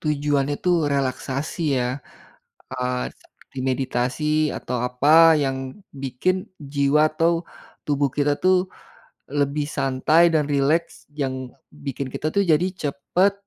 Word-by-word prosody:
tujuannya 145 -2 0
itu 180 - +1 0.2
relaksasi 135 +3 -2 0.2
ya. 125 - 0 0.9
Eee, 125 0 -2
seperti - - -16
meditasi 130 +2 -1 0.3
atau 125 - -4
apa 155 +6 +6
yang 135 -1 -1 0.5
bikin 135 +8 0 0.4
jiwa 140 +1 +3
atau 165 +2 +2 0.5
tubuh 145 -1 +1
kita 145 0 +2
tuh 185 0 +5 0.7
lebih 145 +1 -1
santai 135 +5 +3
dan 155 -1 +3
rileks 145 +4 +1 0.2
yang 140 -3 -2 0.5
bikin 140 -1 -4
kita - - -3
tuh 200 - +3
jadi 160 +4 +3 0.2
cepat, 160 +7 +1
140 Hz, 115 wpm, -23 LUFS, 135-155 Hz, 0.9 s, apa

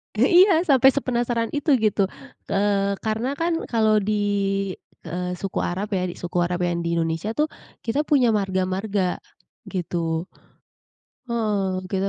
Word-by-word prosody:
Eh, 245 +9 +3 0.2
iya, 335 -4 +3
sampai 270 -5 +6
sepenasaran 240 -3 -1
itu, 290 0 +2
gitu. 210 -4 +2 0.4
Eee, 200 0 +1
karena 225 +5 -1
kan 330 +2 -1
kalau 220 -2 +3
di 210 +1 0 0.8
eee, 180 +1 -3
suku 195 +1 -4
Arab 195 +4 -2
ya, 185 -2 0
suku 175 0 -5
Arab 175 +1 0
yang 175 -1 0
di 170 0 -1
Indonesia 165 +6 -1
tuh 305 +1 +1 0.3
kita 235 +5 -1
punya 255 -6 +4
marga-marga, 190 -1 -1 0.5
gitu. 170 -3 -2 1.1
Heeh, 205 -5 0
kita 195 0 0
205 Hz, 135 wpm, -23 LUFS, 180-235 Hz, 1.1 s, sampai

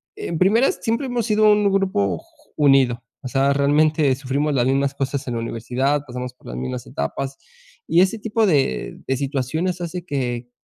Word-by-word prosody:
en 170 - -4
primera, 220 +8 +4
siempre 230 +4 -2
hemos 245 -3 -1
sido 215 -1 +4
un 210 -1 +3
grupo 100 - +1
j - - -20
j - - -30
unido. 135 -4 +4 0.2
O - - -4
sea, 135 +2 +2
realmente 145 0 +3
sufrimos 140 +3 -1
las 125 -2 +2
mismas 140 +1 +1
cosas 140 0 -3
en 125 - -2
la 115 - -2
universidad, 125 +5 -1
pasamos 125 -1 -6
por - - -26
las - - -6
mismas 65 0 -4
etapas 135 - -4 0.5
y 170 - +4
ese 195 +4 +1
tipo 225 +1 +1
de 145 -7 0
de 135 -1 0
situaciones 150 +7 -2
hace 175 +1 -5
que 125 -5 -3
140 Hz, 185 wpm, -21 LUFS, 130-180 Hz, 0.5 s, primera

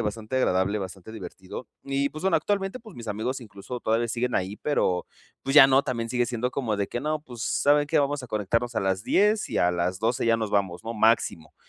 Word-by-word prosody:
bastante 110 +2 -4
agradable, 100 -4 +2
bastante 95 +2 -7
divertido 95 +2 -8 0.2
y 140 0 0
pues 155 - -8
bueno, 190 -3 +3
actualmente, 195 +7 -1
pues, 220 -5 -13
mis 115 -1 -8
amigos 110 +6 -2
incluso 110 +2 -8
todavía 115 +2 +1
siguen 125 +2 -1
ahí, 95 +3 -1
pero, 90 -12 0 0.4
pues 135 - -2
ya 135 -2 +11
no 135 0 +5
también 115 -2 -3
sigue 120 -1 +1
siendo 125 +1 -2
como 120 -7 -1
de 100 -1 -1
que 120 - -3
no. 155 +1 -1
Pues, 125 -6 -11
saben 145 +3 +3
qué - - +2
vamos 140 -1 -1
a - - -8
conectarnos 115 +2 -1
a - - +2
las 95 +1 -1
10 210 - +3
y - - -1
a 90 - +4
las 90 +2 -1
12 115 +1 0
ya 115 0 +4
nos 110 -2 -3
vamos, 95 -3 0
no 115 - -3
máximo. 110 -8 +1
115 Hz, 225 wpm, -26 LUFS, 100-135 Hz, 0.4 s, ya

